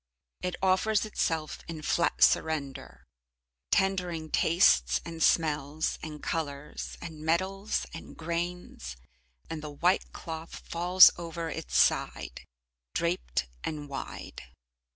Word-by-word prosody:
It 180 0 -2
offers 200 +3 +3
itself 165 -7 -1
in 160 -2 -6
flat 170 +2 +2
surrender, 140 -4 +1 0.6
tendering 180 -5 0
tastes, 65 - +4
and 165 -1 -7
smells, 155 -2 +1
and 150 -1 -8
colours, 150 -3 -4
and 160 -2 -7
metals, 190 +6 0
and 165 - -9
grains, 170 - -4 0.5
and 160 -1 -5
the 150 - -6
white 170 +6 +1
cloth 160 -1 -7
falls 180 +2 +7
over 170 -1 -4
its 160 - -3
side, - - +1 0.5
draped 170 - 0 0.2
and 150 -2 -4
wide. 140 -1 -7
165 Hz, 110 wpm, -29 LUFS, 150-175 Hz, 0.6 s, falls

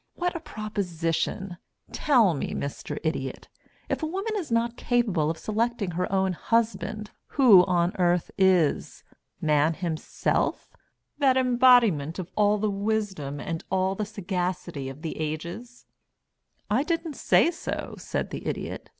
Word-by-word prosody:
"What 355 0 -1
a - - -2
proposition. 195 - -3 0.3
Tell 240 - +3
me, 140 - -3
Mr. 145 +1 -4
Idiot, 135 -5 -3 0.4
if - - -2
a 315 - -1
woman 390 +6 -3
is 360 - -4
not 230 +1 +1
capable 215 -13 +1
of 165 - -2
selecting 220 -1 -1
her 180 +2 -2
own 190 -1 +1
husband, 215 +1 -1 0.3
who 225 -10 +8
on 175 0 +1
earth 175 -1 +2
is? 185 -6 +2 0.4
Man 155 +1 +3
himself 170 -3 -2 0.5
that 265 -3 +4
embodiment 240 - +4
of 185 -3 -6
all 210 0 +3
the 215 +1 0
wisdom 195 -9 -2
and 165 +2 -4
all 190 0 +1
the 210 +2 -3
sagacity 180 - -3
of 135 +4 -10
the 160 - -4
ages?" 170 +10 -5 0.8
"I 215 +6 +2
didn't 330 +1 -2
say 330 - +3
so," 335 - -5
said - - -3
the - - -6
Idiot. - - -4
195 Hz, 140 wpm, -26 LUFS, 165-235 Hz, 0.8 s, who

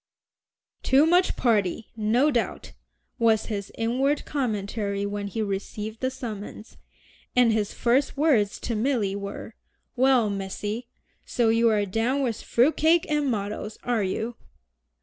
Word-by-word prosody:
"Too 270 +3 +4
much 355 +3 +3
party, 215 -3 0
no 230 +7 +2
doubt," 240 -4 -2 0.5
was 225 -2 +3
his 200 -1 -5
inward 260 +6 0
commentary 205 -6 -2
when 205 0 -3
he 220 +2 -2
received 210 +2 -4
the 260 - 0
summons; 220 -4 -8 0.6
and 245 -3 +5
his 210 -2 0
first 260 +4 +1
words 255 -10 +2
to 235 - -2
Milly 215 -4 0
were, 200 +2 -6 0.4
"Well, 250 -4 +3
Missy, 205 +4 -4 0.4
so 235 -2 +1
you 230 +1 +4
are 210 -2 +2
down 230 +8 0
with 235 -4 -2
fruit 255 +7 +2
cake 320 +2 +4
and 295 -2 +1
mottoes, 210 -1 -3
are 240 -3 0
you?" 220 +5 -3
225 Hz, 135 wpm, -25 LUFS, 205-260 Hz, 0.6 s, and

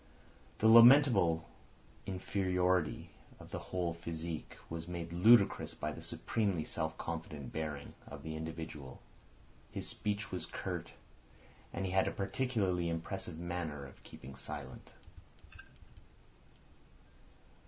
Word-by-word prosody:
The 110 - +4
lamentable 115 - +8 0.6
inferiority 90 -2 0 0.3
of - - -12
the - - -3
whole 90 -2 -2
physique 85 -1 -5
was 80 0 -5
made 85 -1 -5
ludicrous 105 +4 +5
by - - -2
the - - -8
supremely 100 -8 -1
self 80 -1 -3
confident 80 -5 -5
bearing 75 -2 -4
of 70 0 -9
the 80 -1 -4
individual. 80 -4 -6 0.7
His - - -5
speech 105 0 -2
was - - -3
curt, - - -4 0.8
and 95 - -3
he 95 - -2
had 95 0 +3
a - - +1
particularly 95 -4 0
impressive 85 0 -4
manner 85 -4 -4
of 70 - -14
keeping 65 +1 -11
silent. 70 0 -8
85 Hz, 110 wpm, -34 LUFS, 80-95 Hz, 0.8 s, lamentable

